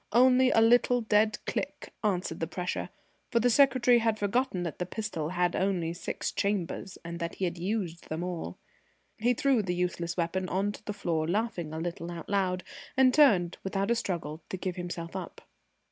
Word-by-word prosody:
Only 255 Hz, +2 st, +6 dB
a 225 Hz, -, +4 dB
little 245 Hz, +2 st, +5 dB
dead 215 Hz, -1 st, +3 dB
click -, -, -4 dB
answered 180 Hz, -5 st, 0 dB
the 165 Hz, -, -1 dB
pressure, 180 Hz, -1 st, -3 dB, 0.4 s
for 235 Hz, -, +2 dB
the 245 Hz, +2 st, +3 dB
secretary 255 Hz, -2 st, +5 dB
had 225 Hz, -1 st, +1 dB
forgotten 205 Hz, -2 st, 0 dB
that 170 Hz, -4 st, -5 dB
the 180 Hz, -, -1 dB
pistol 185 Hz, -7 st, -3 dB
had 175 Hz, 0 st, +1 dB
only 180 Hz, -4 st, 0 dB
six 175 Hz, -, -4 dB
chambers, 195 Hz, -1 st, -2 dB
and 170 Hz, 0 st, -5 dB
that 170 Hz, -1 st, -3 dB
he 190 Hz, -, -1 dB
had 175 Hz, -1 st, -3 dB
used 180 Hz, -3 st, -3 dB
them 160 Hz, +2 st, -3 dB
all. 170 Hz, -, -4 dB, 0.6 s
He 245 Hz, +3 st, +2 dB
threw 265 Hz, -2 st, +3 dB
the 180 Hz, -3 st, -2 dB
useless 175 Hz, -1 st, -2 dB
weapon 180 Hz, +2 st, -1 dB
on 195 Hz, +3 st, 0 dB
to 205 Hz, -, -11 dB
the 210 Hz, -, -3 dB
floor, 165 Hz, -6 st, -1 dB
laughing 180 Hz, -4 st, -1 dB
a 160 Hz, -, -5 dB
little 170 Hz, +1 st, -4 dB
out 170 Hz, -2 st, -7 dB
loud, 185 Hz, -2 st, 0 dB, 0.3 s
and 260 Hz, -1 st, +6 dB
turned, 200 Hz, -, +4 dB
without 195 Hz, +2 st, -1 dB
a -, -, +4 dB
struggle, 170 Hz, -8 st, -3 dB
to 190 Hz, -, -3 dB
give 185 Hz, -1 st, -3 dB
himself 175 Hz, -1 st, -5 dB
up. 185 Hz, -3 st, -6 dB
185 Hz, 190 wpm, -29 LUFS, 170-220 Hz, 0.6 s, Only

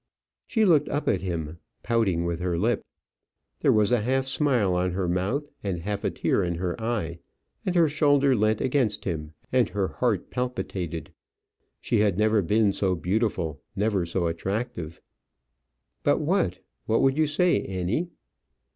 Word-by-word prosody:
She 220 Hz, -3 st, +2 dB
looked 155 Hz, -6 st, +4 dB
up 145 Hz, +1 st, -2 dB
at 95 Hz, -, +2 dB
him, 85 Hz, -3 st, -4 dB, 0.2 s
pouting 100 Hz, -8 st, +1 dB
with 85 Hz, -1 st, -2 dB
her 90 Hz, -1 st, -1 dB
lip. 115 Hz, +7 st, +1 dB, 0.8 s
There -, -, +4 dB
was 105 Hz, 0 st, +3 dB
a 120 Hz, -3 st, +3 dB
half 130 Hz, +4 st, +1 dB
smile 130 Hz, -8 st, +2 dB
on 90 Hz, 0 st, 0 dB
her 95 Hz, -1 st, -1 dB
mouth, 95 Hz, +12 st, -1 dB
and 95 Hz, -3 st, -2 dB
half 100 Hz, +2 st, -3 dB
a -, -, +1 dB
tear -, -, 0 dB
in 85 Hz, -1 st, -1 dB
her 90 Hz, +1 st, -2 dB
eyes; 105 Hz, -8 st, -2 dB, 0.5 s
and 185 Hz, -, 0 dB
her 170 Hz, -2 st, +5 dB
shoulder 145 Hz, -2 st, +3 dB
leant 110 Hz, 0 st, +1 dB
against 130 Hz, -5 st, 0 dB
him, 80 Hz, -4 st, -4 dB, 0.2 s
and 125 Hz, -4 st, +3 dB
her 100 Hz, -2 st, -1 dB
heart 115 Hz, -7 st, -1 dB
palpitated. 95 Hz, -10 st, -4 dB, 0.7 s
She 115 Hz, -, 0 dB
had 105 Hz, -4 st, +2 dB
never 110 Hz, 0 st, +3 dB
been 105 Hz, +3 st, +2 dB
so 95 Hz, -2 st, +1 dB
beautiful, 90 Hz, -, -1 dB
never 100 Hz, -2 st, +1 dB
so 85 Hz, +1 st, -1 dB
attractive. 85 Hz, -1 st, -3 dB, 1.0 s
"But -, -, +2 dB
what? -, -, +1 dB, 0.3 s
What 115 Hz, -, +2 dB
would 135 Hz, 0 st, +4 dB
you 155 Hz, 0 st, +2 dB
say, 150 Hz, -, +2 dB
Annie?" 95 Hz, -, -2 dB
105 Hz, 160 wpm, -26 LUFS, 90-125 Hz, 1.0 s, her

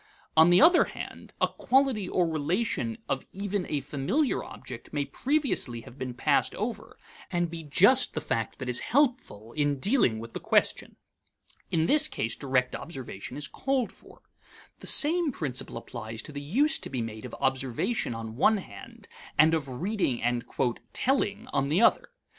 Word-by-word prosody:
On 160 Hz, +2 st, +7 dB
the 175 Hz, +8 st, +6 dB
other 345 Hz, +2 st, +7 dB
hand, -, -, -9 dB
a -, -, +3 dB
quality 260 Hz, -7 st, +1 dB
or 180 Hz, -, +2 dB
relation 180 Hz, +9 st, -1 dB
of 135 Hz, -, -2 dB
even 200 Hz, -1 st, -3 dB
a 145 Hz, -2 st, -1 dB
familiar 145 Hz, -, -1 dB
object 125 Hz, -2 st, -9 dB
may 145 Hz, -1 st, -1 dB
previously 265 Hz, -, -1 dB
have 120 Hz, +3 st, -14 dB
been 125 Hz, -2 st, -4 dB
passed -, -, +1 dB
over, -, -, -5 dB, 0.3 s
and 175 Hz, -1 st, -1 dB
be 165 Hz, -1 st, -6 dB
just 200 Hz, -, +4 dB
the -, -, 0 dB
fact 115 Hz, -1 st, -3 dB
that 130 Hz, -, -6 dB
is 125 Hz, 0 st, +1 dB
helpful 240 Hz, -, 0 dB
in 145 Hz, -2 st, +1 dB
dealing 195 Hz, -, +2 dB
with 115 Hz, +1 st, -8 dB
the -, -, -4 dB
question. -, -, +1 dB, 0.7 s
In 160 Hz, -1 st, +1 dB
this 305 Hz, -, +5 dB
case 115 Hz, -, -2 dB
direct 130 Hz, -2 st, 0 dB
observation 135 Hz, -, -7 dB
is 145 Hz, -1 st, -3 dB
called 265 Hz, -, -1 dB
for. -, -, -18 dB, 0.6 s
The -, -, -6 dB
same 325 Hz, +1 st, +5 dB
principle 135 Hz, -, -3 dB
applies 115 Hz, -1 st, -6 dB
to -, -, -8 dB
the 145 Hz, -1 st, -6 dB
use 280 Hz, -, +1 dB
to -, -, -6 dB
be 125 Hz, -3 st, -2 dB
made 110 Hz, -1 st, -7 dB
of -, -, -7 dB
observation 130 Hz, -, -1 dB
on 110 Hz, -1 st, -6 dB
one 215 Hz, -, +4 dB
hand 100 Hz, -, -11 dB, 0.3 s
and 155 Hz, +2 st, +6 dB
of 150 Hz, -4 st, -1 dB
reading 170 Hz, -, -1 dB
and 120 Hz, 0 st, 0 dB, 0.5 s
"telling" 235 Hz, -4 st, 0 dB
on 140 Hz, 0 st, +1 dB
the 165 Hz, +8 st, +2 dB
other. -, -, +4 dB
155 Hz, 170 wpm, -28 LUFS, -, 0.7 s, On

